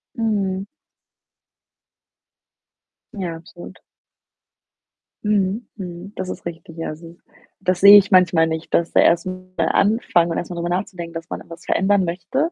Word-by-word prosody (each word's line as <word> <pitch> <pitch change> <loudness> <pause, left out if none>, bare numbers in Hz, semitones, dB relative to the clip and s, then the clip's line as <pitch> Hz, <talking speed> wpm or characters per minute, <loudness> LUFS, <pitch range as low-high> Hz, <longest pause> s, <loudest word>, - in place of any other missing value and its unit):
Mhm. 200 -4 -1 2.5
Ja, 180 -5 -4
absolut. 170 +1 -12 1.4
Mhm, 210 +2 0
mhm. 185 0 -8
Das 185 - -5
ist 180 - -7
richtig, 165 -1 -8
ja. 165 - -4
Also, 165 +2 -10 0.4
das 185 -1 -1
sehe 200 +1 +11
ich 205 0 +4
manchmal 175 -3 +5
nicht, 160 0 -5
dass 170 - +2
der - - +5
erst 170 +1 +3
mal 185 0 -7 0.2
anfangen 195 -5 +2
und - - -2
erst 175 - -4
mal 175 - -6
drüber 170 0 -3
nachzudenken, 180 -2 -4
dass 165 +1 -7
man - - -4
irgendwas 165 0 -12
verändern 195 -1 +2
möchte, 195 - -2
180 Hz, 145 wpm, -21 LUFS, 170-200 Hz, 2.5 s, sehe